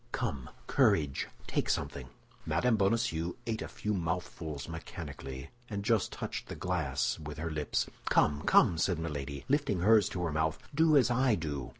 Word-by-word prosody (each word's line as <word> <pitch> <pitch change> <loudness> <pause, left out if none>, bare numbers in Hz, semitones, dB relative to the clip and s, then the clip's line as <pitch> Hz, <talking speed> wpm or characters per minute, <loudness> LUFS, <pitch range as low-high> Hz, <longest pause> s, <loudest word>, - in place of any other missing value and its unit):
Come, 65 -3 -3 0.2
courage! 70 -4 +2 0.2
take - - -1
something." 65 -3 -2 0.4
Mme. 125 -1 +2
Bonacieux 100 -5 +1
ate 110 -1 -2
a - - -4
few 105 - -3
mouthfuls 85 -4 -3
mechanically, 70 -5 -7 0.2
and 100 -2 -4
just 115 -3 +2
touched - - -5
the - - -6
glass 90 -8 -1
with 75 -1 -7
her 80 +1 -3
lips. 75 -1 0 0.2
"Come, 75 -1 +3
come!" 80 - +4
said 90 0 +2
Milady, 70 -3 -4
lifting 135 - +1
hers 105 0 +5
to 90 - -3
her 85 - 0
mouth, 80 +1 0 0.2
"do 155 0 +5
as 125 -2 +4
I 125 -1 +3
do." 75 -7 -4
85 Hz, 165 wpm, -31 LUFS, 75-105 Hz, 0.4 s, hers